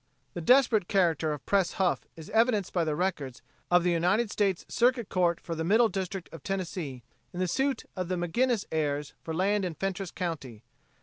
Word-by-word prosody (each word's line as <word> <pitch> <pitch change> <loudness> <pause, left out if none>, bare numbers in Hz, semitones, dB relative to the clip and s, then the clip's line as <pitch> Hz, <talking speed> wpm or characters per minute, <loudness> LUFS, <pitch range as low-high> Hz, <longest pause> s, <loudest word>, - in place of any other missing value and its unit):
The 175 - -5
desperate 230 -1 +4
character 165 -5 +2
of 145 -4 -6
Pres 195 -3 +2
Huff 185 -2 0
is 160 -1 -10
evidenced 220 -3 +2
by 175 - +2
the 155 -2 -1
records 150 -9 -2 0.3
of 175 0 +4
the 180 - +2
United 185 +7 +2
States 195 -4 0
Circuit 240 -2 +1
Court 175 -2 +1
for 170 - -6
the 160 0 -3
Middle 220 +6 +4
District 190 -2 -4
of 165 - -9
Tennessee 170 -9 -4 0.3
in 180 - -7
the 185 - +1
suit 270 +8 0
of 185 -2 -3
the 185 - -1
McGinnis 205 +6 0
heirs 150 -2 -1
for 165 - -6
land 195 +5 +1
in 175 -3 -3
Fentress 195 0 -3
county. 145 - -5
180 Hz, 190 wpm, -29 LUFS, 165-200 Hz, 0.3 s, desperate